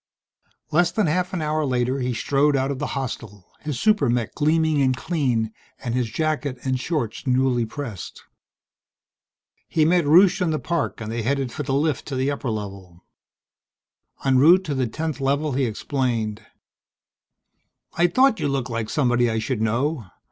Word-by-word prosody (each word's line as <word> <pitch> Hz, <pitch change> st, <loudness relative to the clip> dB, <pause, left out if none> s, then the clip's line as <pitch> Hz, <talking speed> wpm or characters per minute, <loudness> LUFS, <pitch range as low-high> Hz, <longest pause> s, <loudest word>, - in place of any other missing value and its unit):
Less 175 Hz, +2 st, +3 dB
than 215 Hz, +1 st, 0 dB
half 180 Hz, +3 st, 0 dB
an 170 Hz, -4 st, -2 dB
hour 155 Hz, +1 st, 0 dB
later 130 Hz, -1 st, 0 dB
he 125 Hz, -1 st, -1 dB
strode 140 Hz, +5 st, +2 dB
out 135 Hz, +1 st, 0 dB
of 135 Hz, -, -4 dB
the 145 Hz, -1 st, -3 dB
hostel, 110 Hz, -7 st, -6 dB
his 150 Hz, -5 st, -4 dB
super 210 Hz, -, +3 dB
mech 120 Hz, -2 st, -1 dB
gleaming 155 Hz, -1 st, +2 dB
and 130 Hz, -1 st, +2 dB
clean 130 Hz, -9 st, -1 dB, 0.2 s
and 120 Hz, -3 st, -4 dB
his 125 Hz, -2 st, 0 dB
jacket 150 Hz, +1 st, -1 dB
and 130 Hz, -1 st, 0 dB
shorts 130 Hz, -4 st, -3 dB
newly 125 Hz, -2 st, +2 dB
pressed. 115 Hz, -, -7 dB, 1.4 s
He 155 Hz, -, +2 dB
met 170 Hz, -1 st, +3 dB
Rusche 180 Hz, +5 st, +6 dB
in 180 Hz, -, +2 dB
the 155 Hz, -, 0 dB
park 170 Hz, -6 st, -2 dB
and 110 Hz, 0 st, -5 dB
they 115 Hz, 0 st, -2 dB
headed 135 Hz, +1 st, -1 dB
for 150 Hz, -, -5 dB
the 135 Hz, -1 st, -1 dB
lift 145 Hz, -1 st, 0 dB
to 140 Hz, -, -4 dB
the 130 Hz, +2 st, 0 dB
upper 140 Hz, -3 st, -3 dB
level. 100 Hz, -5 st, -7 dB, 1.2 s
En 130 Hz, -1 st, +4 dB
route 175 Hz, +7 st, +6 dB
to 155 Hz, -, -3 dB
the 130 Hz, -2 st, 0 dB
10th 155 Hz, +4 st, -4 dB
Level 140 Hz, +3 st, 0 dB
he 135 Hz, 0 st, +1 dB
explained. 115 Hz, -2 st, -2 dB, 1.5 s
"I 175 Hz, +1 st, +3 dB
thought 255 Hz, +5 st, +3 dB
you -, -, 0 dB
looked 135 Hz, -3 st, -2 dB
like 115 Hz, -1 st, -3 dB
somebody 120 Hz, -3 st, +2 dB
I 110 Hz, -, -1 dB
should 110 Hz, +1 st, -2 dB
know." 120 Hz, -, 0 dB
135 Hz, 170 wpm, -23 LUFS, 120-155 Hz, 1.5 s, Rusche